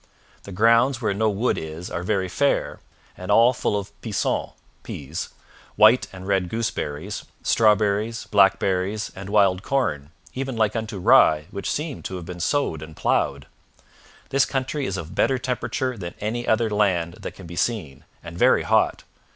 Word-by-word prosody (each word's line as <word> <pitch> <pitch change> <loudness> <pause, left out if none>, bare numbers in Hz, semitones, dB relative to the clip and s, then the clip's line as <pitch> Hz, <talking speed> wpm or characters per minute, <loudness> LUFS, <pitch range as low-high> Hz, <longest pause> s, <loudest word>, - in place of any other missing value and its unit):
The 100 - -9
grounds 115 +6 +3
where 110 -5 0
no 110 +2 +1
wood 105 +5 0
is 80 +3 -7
are 85 - -3
very 95 0 0
fair, 140 +10 0 0.4
and 90 - -9
all 115 +4 +5
full 105 - -1
of 100 -1 -5
peason 110 -4 -2 0.3
[peas], 75 +3 -6 0.5
white 110 +4 +5
and 95 -1 -10
red 95 -3 +1
gooseberries, 110 -10 -3 0.2
strawberries, 110 0 +2
blackberries, 95 0 +2
and 95 +1 -8
wild 100 -3 +3
corn, 75 - -1 0.2
even 130 -2 -4
like 110 -1 +1
unto 110 -2 -3
rye, 75 -4 +5
which 100 -2 -4
seemed 150 -2 -3
to 95 - -4
have 90 -2 -7
been 90 0 -8
sowed 85 - 0
and 80 0 -10
ploughed. - - 0 0.8
This 135 0 +3
country 135 +1 -2
is 95 - -3
of 85 -4 -7
better 135 - +2
temperature 130 +1 -2
than 85 -5 -7
any 120 +3 -3
other 110 0 +2
land 90 -5 +1
that - - -7
can 95 - -11
be 85 +1 -9
seen, 85 - -2 0.2
and 85 0 -9
very - - +4
hot. - - +2
105 Hz, 165 wpm, -23 LUFS, 90-115 Hz, 0.8 s, all